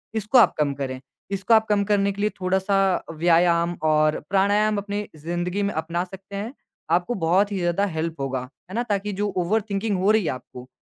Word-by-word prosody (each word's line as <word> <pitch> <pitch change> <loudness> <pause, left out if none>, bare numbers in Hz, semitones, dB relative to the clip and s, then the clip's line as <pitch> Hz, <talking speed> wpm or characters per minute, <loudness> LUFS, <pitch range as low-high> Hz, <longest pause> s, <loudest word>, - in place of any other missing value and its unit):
इसको 220 +4 +2
आप 230 - +5
कम 145 -2 +1
करें, 130 -2 -4 0.3
इसको 195 +3 +1
आप 220 0 +5
कम 205 -1 +3
करने 200 -1 +2
के 200 +1 -6
लिए 210 - +2
थोड़ा-सा 190 +1 +1
व्यायाम 170 +1 +3
और 155 0 +3
प्राणायाम 205 +2 +2
अपनी 205 +1 -3 0.2
ज़िंदगी 175 +3 -2
में 200 - -1
अपना 165 +2 -2
सकते 190 +2 -11
हैं। 215 +5 -4 0.4
आपको 175 +7 +2
बहुत 190 +5 +3
ही 200 - -2
ज़्यादा 175 +3 +1
हेल्प 160 -3 -3
होगा, 130 -1 -2 0.3
है 190 - -7
ना? 240 - 0
ताकि 205 -2 -2
जो 205 +2 -1
ओवरथिंकिंग 200 +2 0
हो 200 +3 +3
रही 220 -2 +3
है - - 0
आपको, 125 0 -9
195 Hz, 195 wpm, -23 LUFS, 170-205 Hz, 0.4 s, आप